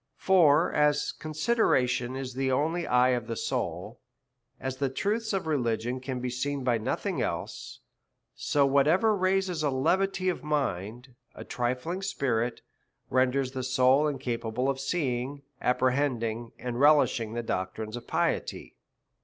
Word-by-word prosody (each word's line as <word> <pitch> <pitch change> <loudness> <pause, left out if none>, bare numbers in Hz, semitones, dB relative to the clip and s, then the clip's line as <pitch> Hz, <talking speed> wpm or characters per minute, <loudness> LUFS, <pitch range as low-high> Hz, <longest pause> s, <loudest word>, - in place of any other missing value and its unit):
73 - - -22
For 170 -4 +5
as 150 0 +2
consideration 150 - 0
is 130 -1 -5
the 130 +1 -1
only 160 +6 0
eye 125 +1 +4
of 120 -3 0
the 115 - -3
soul, 100 +4 -3 0.6
as 130 0 -4
the 140 -1 0
truths 215 - -1
of 195 -4 -1
religion 125 -4 -1
can 130 0 -4
be 125 0 -3
seen 140 +2 -2
by 120 -3 +1
nothing 110 - -2
else; - - -4 0.5
so 145 -1 +1
whatever 155 +11 +3
raises 185 -3 0
a 150 - +1
levity 185 +8 +1
of 180 - -1
mind, 125 -4 -2 0.2
a - - -8
trifling 130 +9 -2
spirit, 125 -10 -1 0.5
ren 130 0 +4
ders 135 0 -1
the 130 -1 -4
soul 130 +3 +3
incapable 125 -3 -2
of 135 - -6
seeing, 135 -2 -2 0.2
apprehending, 125 -3 0
and 125 -1 -4
relishing 140 -6 +4
the 120 0 -3
doctrines 110 +2 -3
of 120 - -8
piety. - - -2
130 Hz, 145 wpm, -28 LUFS, 125-150 Hz, 0.6 s, For